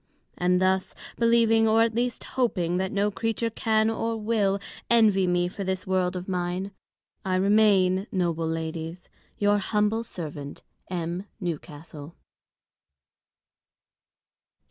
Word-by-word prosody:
And 180 0 +2
thus, 185 0 +1 0.2
believing, 230 -1 +4
or, 225 +1 +5
at 230 -1 0
least, 240 +1 -1
hoping, 180 -9 0
that 190 0 -1
no 205 +1 +1
Creature 225 +2 -2
can, 220 0 +1
or 225 0 -1
will, 210 -3 +1 0.3
Envy 210 -5 +4
me 175 0 +2
for 195 +2 -6
this 190 -1 -2
World 185 -1 0
of 180 0 -5
mine, 180 +1 -2 0.5
I 190 -2 0
remain, 195 -1 +3
Noble 170 -3 0
Ladies, 165 +1 -5 0.3
Your 205 0 +3
Humble 210 +2 0
Servant, 150 -9 -7 0.3
M. 175 +1 -3
Newcastle. 155 -2 -7
190 Hz, 120 wpm, -26 LUFS, 175-220 Hz, 0.5 s, or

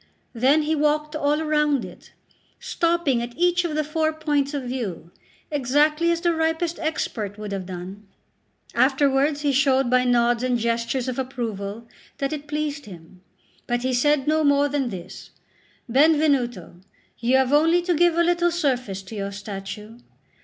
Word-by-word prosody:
Then 270 +6 +3
he 310 +1 0
walked 300 0 0
all 300 +1 +1
round 300 -3 +1
it, - - -14 0.5
stopping 335 -7 0
at 240 0 -7
each 355 +1 +2
of 330 -3 -3
the 310 - +1
four 315 +1 0
points 295 -2 -1
of 280 - -3
view, 225 -10 -5 0.4
exactly 300 +4 +2
as 335 0 0
the 345 -1 +2
ripest 320 +1 -1
expert 225 - -3
would 210 -1 -6
have 190 -2 -4
done. 190 +3 -8 0.7
Afterwards 275 +2 +2
he 290 -1 +1
showed 270 -2 +2
by 250 0 +4
nods 240 -1 +2
and 255 -1 +1
gestures 235 +2 -1
of 255 0 -3
approval 230 -4 -5 0.3
that 275 +1 -2
it 295 -1 -6
pleased 295 -2 -3
him; 180 -1 -13 0.5
but 240 0 -1
he 260 0 0
said 280 +2 +2
no 310 +1 +2
more 285 0 +3
than 280 -3 -1
this: 180 -5 -9 0.6
"Benvenuto, 270 - +2 0.4
you 245 +3 +3
have 265 +1 +1
only 330 +4 +4
to 350 0 +1
give 340 +1 +3
a 340 - +4
little 345 0 +2
surface 250 - -1
to 190 - -11
your 200 -1 -4
statue." 200 +2 -8
275 Hz, 160 wpm, -23 LUFS, 235-305 Hz, 0.7 s, by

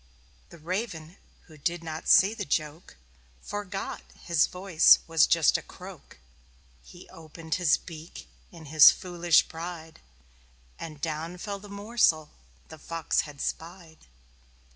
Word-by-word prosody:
The - - -14
Raven, 175 0 -5 0.3
who 155 -3 -17
did 170 +3 -2
not 160 -1 -7
see 195 +3 +6
the - - -5
joke, 150 - -4 0.4
Forgot 200 - -6
that - - -22
his 170 -3 +2
voice 180 -3 +4
was 165 -2 +3
just 165 -3 +3
a - - -11
croak. - - -13 0.6
He - - -15
opened 160 0 -9
his 165 -5 +4
beak, 165 0 -11 0.2
in 165 -2 -13
his 155 0 +8
foolish 175 -2 +1
pride 165 -1 -8 0.8
And 155 -3 -8
down 165 +2 -4
fell 200 +2 -6
the 205 +1 -13
morsel 200 -6 0 0.4
the 160 - -12
Fox 165 0 -1
had 145 -1 -13
spied. 165 - -7
165 Hz, 135 wpm, -27 LUFS, 155-180 Hz, 0.8 s, his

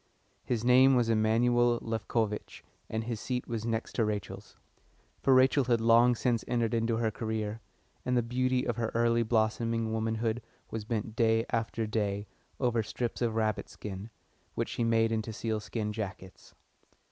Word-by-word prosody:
His 120 -2 -2
name 130 +2 +6
was 120 -2 +2
Emanuel 120 +2 +3
Lefkovitch, 110 -1 -2 0.3
and 110 0 -2
his 115 -1 -4
seat 125 +2 -3
was 115 -1 -3
next 115 0 -2
to 115 - +1
Rachel's. 105 -2 -4 0.6
For 135 - +3
Rachel 130 +1 +5
had 120 -2 +2
long 115 +2 +5
since 120 -1 0
entered 120 -2 0
into 115 0 +1
her 115 -1 0
career, 110 0 -3 0.4
and 125 0 +1
the 120 - +2
beauty 130 +2 0
of - - -2
her 115 -1 -1
early 115 0 +3
blossoming 115 0 0
womanhood 110 +1 -1 0.3
was 110 -2 -4
bent 110 -1 -3
day 115 0 +3
after 115 -1 -1
day 105 -2 -1 0.3
over 120 -3 +2
strips 115 +3 -4
of 115 -2 0
rabbit 110 -2 -1
skin, 100 +1 -7 0.5
which - - -1
she 120 - -2
made 115 -1 +3
into 110 0 -2
sealskin 110 0 -3
jackets. 95 -3 -7
115 Hz, 160 wpm, -30 LUFS, 110-120 Hz, 0.6 s, name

